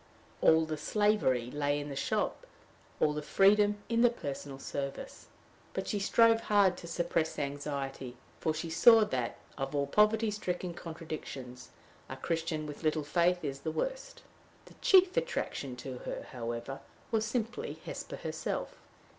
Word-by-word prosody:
All 160 0 +5
the 155 -1 -3
slavery 150 - +1
lay 145 0 0
in 145 0 -5
the 140 - -5
shop, - - -1 0.5
all 150 - +3
the 150 - -3
freedom 205 +6 +4
in 230 0 +2
the 240 - +7
personal 140 - -6
service. 140 0 -6 0.5
But 190 - -2
she 205 - -1
strove 225 +3 +4
hard 200 -4 +4
to 170 - -9
suppress 170 -1 -1
anxiety, 140 -3 -4 0.2
for 160 - +1
she 155 +1 -4
saw 225 +6 +7
that, 125 - -2 0.2
of 135 +2 -3
all 140 0 +2
poverty 215 +7 +3
stricken 180 -3 -3
contradictions, 155 -7 -7 0.4
a - - -6
Christian 165 -2 -2
with 150 -1 -8
little 155 -1 +1
faith 175 +4 +2
is 135 -1 -3
the 160 - -3
worst. - - -4 0.4
The - - -15
chief 375 0 +6
attraction 470 - -2
to 125 0 -7
her, - - -5
however, 120 +2 -4 0.3
was 220 -1 +2
simply 230 +1 -3
Hesper - - -6
herself. - - -4
160 Hz, 150 wpm, -31 LUFS, 140-210 Hz, 0.5 s, the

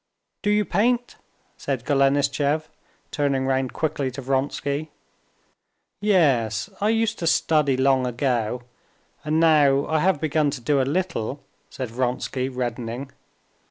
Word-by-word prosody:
"Do 205 - 0
you 210 0 +3
paint?" 240 +7 0 0.4
said 130 -4 -3
Golenishtchev, 140 +2 +2 0.5
turning 140 -2 0
round 130 -1 0
quickly 145 -4 -1
to 130 +2 -7
Vronsky. 140 +3 -1 1.1
"Yes, 140 - +2
I 210 - +2
used 225 0 +1
to 165 - -2
study 150 -5 +2
long 130 -1 +3
ago, 120 -1 -1 0.6
and 155 +2 +1
now 145 -4 +4
I 160 0 0
have 180 -1 +2
begun 155 -1 +1
to - - -10
do 140 +3 +2
a 130 - -1
little," 145 -7 -3 0.3
said 130 -4 -6
Vronsky, 125 +1 -2
reddening. 125 +1 -4
140 Hz, 125 wpm, -23 LUFS, 130-155 Hz, 1.1 s, now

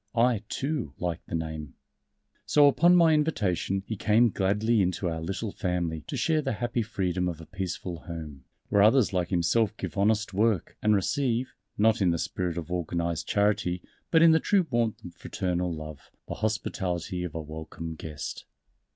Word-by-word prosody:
"I, 115 -2 +3
too, 135 - -3
like 85 -1 -3
the - - -3
name." 80 -3 -5 0.7
So 145 -1 +6
upon 170 +7 +5
my 165 -2 +6
invitation 100 - 0
he 110 - -4
came 110 +3 +3
gladly 105 +4 +2
into 90 0 0
our 80 -1 -3
little 95 +5 -3
Family 85 -4 -2
to - - -4
share 160 -2 +2
the 135 -4 -2
happy 120 +2 -1
freedom 90 -4 -1
of 85 -2 -6
a 80 - -10
peaceful 90 -1 -5
home, 80 -6 -8 0.3
where 100 - +4
others 110 +1 +5
like 90 -2 0
himself 100 +5 +1
give 100 - -4
honest 105 0 +2
work 105 -2 +1
and 105 0 +4
receive 125 +4 0 0.2
not 110 0 +3
in 95 - +4
the 85 - +1
spirit 90 +1 -3
of 85 0 -5
organized 85 -1 -2
charity, 100 -4 +1 0.3
but 165 -1 +5
in 165 - +8
the 160 - +5
true 195 0 +2
warmth 115 -4 0
of 90 - -8
fraternal 90 0 -2
love 75 -2 -8 0.2
the - - -4
hospitality 90 -4 -2
of 85 -3 -6
a - - -2
welcome 80 +1 -7
guest. 80 -2 -7
95 Hz, 175 wpm, -27 LUFS, 85-115 Hz, 0.7 s, in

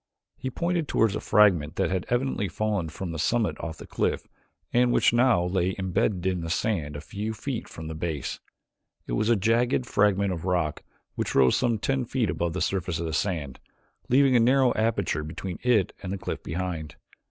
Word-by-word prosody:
He 130 - -4
pointed 170 +3 -1
toward 110 -3 +2
a - - -1
fragment 90 -8 +3
that 95 -4 0
had 95 -2 -2
evidently 120 -4 0
fallen 105 -5 -1
from 85 +2 -5
the 80 - -5
summit 115 +6 +1
of 80 -1 -5
the - - -10
cliff - - -1 0.5
and 120 0 +4
which - - +4
now 120 -7 +4
lay 90 +1 0
imbedded 95 0 0
in 90 -2 0
the 80 - -4
sand 80 -6 -1
a 75 - -5
few 105 +7 -5
feet 125 +2 -4
from 80 - -9
the 80 - -5
base. 80 -2 -3 0.7
It - - -7
was 85 - +1
a 120 - +5
jagged 115 +5 +2
fragment 100 -3 +2
of 85 -2 -6
rock 85 -5 0 0.3
which - - -3
rose 65 -2 +5
some 120 -3 +1
ten 135 +3 -1
feet 120 -2 0
above 85 -1 -2
the 90 - -3
surface 90 -3 -1
of 85 - -3
the 80 - -3
sand, 80 -8 -2 0.5
leaving 135 0 +5
a - - +6
narrow 130 +2 +4
aperture 100 -9 0
between 85 +4 -6
it 115 -6 +2
and 95 - -5
the 100 - -2
cliff - - -5
behind. 85 -2 -4
95 Hz, 200 wpm, -26 LUFS, 85-115 Hz, 0.7 s, a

